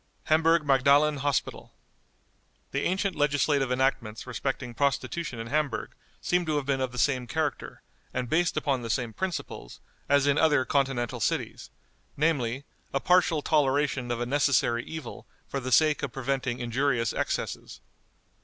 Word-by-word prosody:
Hamburg 160 Hz, 0 st, +3 dB
Magdalen 140 Hz, +2 st, +4 dB
Hospital. 140 Hz, 0 st, -2 dB, 1.0 s
The -, -, -1 dB
ancient 190 Hz, +2 st, 0 dB
legislative 145 Hz, -2 st, +1 dB
enactments 125 Hz, -4 st, -1 dB
respecting 125 Hz, 0 st, -4 dB
prostitution 140 Hz, +2 st, -1 dB
in 115 Hz, -, -5 dB
Hamburg 145 Hz, +3 st, -1 dB, 0.3 s
seem 180 Hz, 0 st, +1 dB
to 155 Hz, -, 0 dB
have 145 Hz, -2 st, -1 dB
been 135 Hz, -1 st, 0 dB
of 130 Hz, -1 st, -1 dB
the 125 Hz, -, -9 dB
same 125 Hz, -1 st, +1 dB
character, 155 Hz, +4 st, -3 dB, 0.3 s
and 125 Hz, -1 st, -3 dB
based 165 Hz, +5 st, +1 dB
upon 140 Hz, -4 st, 0 dB
the 115 Hz, -, -6 dB
same 120 Hz, -1 st, -1 dB
principles, 180 Hz, -, -5 dB, 0.3 s
as 140 Hz, -1 st, +4 dB
in 145 Hz, +1 st, +3 dB
other 150 Hz, -5 st, +3 dB
Continental 135 Hz, -5 st, 0 dB
cities, -, -, -2 dB, 0.5 s
namely, 140 Hz, -4 st, 0 dB, 0.3 s
a -, -, +3 dB
partial 170 Hz, -2 st, +3 dB
toleration 140 Hz, -4 st, +1 dB
of 120 Hz, -1 st, -2 dB
a 120 Hz, -, -1 dB
necessary 125 Hz, -3 st, +2 dB
evil 160 Hz, -1 st, -8 dB, 0.2 s
for 140 Hz, -, -3 dB
the 130 Hz, 0 st, -5 dB
sake 155 Hz, +3 st, +4 dB
of 140 Hz, -, -3 dB
preventing 130 Hz, -1 st, -2 dB
injurious 120 Hz, -1 st, 0 dB
excesses. -, -, -3 dB
140 Hz, 145 wpm, -27 LUFS, 125-150 Hz, 1.0 s, Magdalen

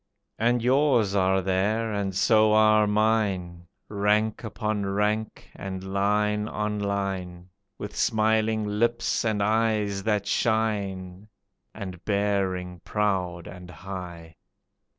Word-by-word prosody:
And 120 Hz, +1 st, +2 dB
yours 125 Hz, -5 st, +3 dB
are 95 Hz, -1 st, +2 dB
there, 105 Hz, +4 st, 0 dB
and 100 Hz, -2 st, -2 dB
so 110 Hz, +2 st, +4 dB
are 110 Hz, 0 st, +5 dB
mine, 100 Hz, -5 st, 0 dB, 0.2 s
Rank 105 Hz, +2 st, 0 dB
upon 110 Hz, -1 st, -2 dB
rank 105 Hz, +2 st, -2 dB
and 95 Hz, -1 st, -6 dB
line 105 Hz, +1 st, +1 dB
on 105 Hz, -1 st, -2 dB
line, 95 Hz, -3 st, -3 dB, 0.3 s
With 105 Hz, 0 st, -7 dB
smiling 110 Hz, -1 st, +1 dB
lips 115 Hz, +3 st, 0 dB
and 110 Hz, -3 st, 0 dB
eyes 105 Hz, -2 st, +1 dB
that 105 Hz, -1 st, 0 dB
shine, 100 Hz, -4 st, -1 dB, 0.5 s
And 95 Hz, -4 st, -7 dB
bearing 95 Hz, -3 st, -1 dB
proud 95 Hz, -5 st, -1 dB
and 90 Hz, -1 st, -10 dB
high. 85 Hz, -2 st, -8 dB
105 Hz, 110 wpm, -26 LUFS, 95-110 Hz, 0.5 s, are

